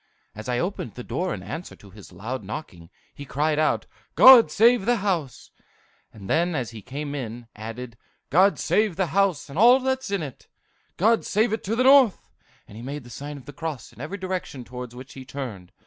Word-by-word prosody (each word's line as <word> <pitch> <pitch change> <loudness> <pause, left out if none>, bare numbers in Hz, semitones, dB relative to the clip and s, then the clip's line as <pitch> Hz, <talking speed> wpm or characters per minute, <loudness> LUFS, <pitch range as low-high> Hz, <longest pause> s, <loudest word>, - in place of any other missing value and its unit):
As 110 +3 -8
I 125 - 0
opened 170 - -3
the 125 - -7
door 175 +11 -2
in 95 - -5
answer 160 - -7
to 100 - -17
his 100 -1 -14
loud 110 +7 -6
knocking, 95 - -8 0.2
he 145 - -9
cried 150 +3 0
out, 155 - +1 0.3
'God 255 -3 +9
save 230 -1 +4
the 245 - +4
house!' 180 - -3 0.6
then, 160 - -1
as 125 -5 -3
he 110 -2 -10
came 140 +5 -6
in, 120 -4 -6
added, 115 +2 -8 0.3
'God 190 +7 +4
save 210 -4 +1
the 190 +1 +1
house, 195 -6 +1
and 145 +5 -6
all 245 +4 +7
that's 265 -1 -2
in 200 -4 -1
it! 140 -4 -9 0.5
God 225 +5 +3
save 215 +2 +1
it 220 - -3
to 215 +4 -1
the 255 - +2
north!' 265 -5 +5 0.4
and 105 - -14
he - - -8
made 140 +3 -6
the 120 - -13
sign 145 +4 -7
of 135 - -13
the 145 - -10
cross 155 -3 -6
in - - -12
every 160 +8 -5
direction 185 -8 -5
towards 125 0 -8
which 130 +2 -11
he 135 - -9
turned. 125 -9 -7
145 Hz, 205 wpm, -24 LUFS, 120-195 Hz, 0.6 s, God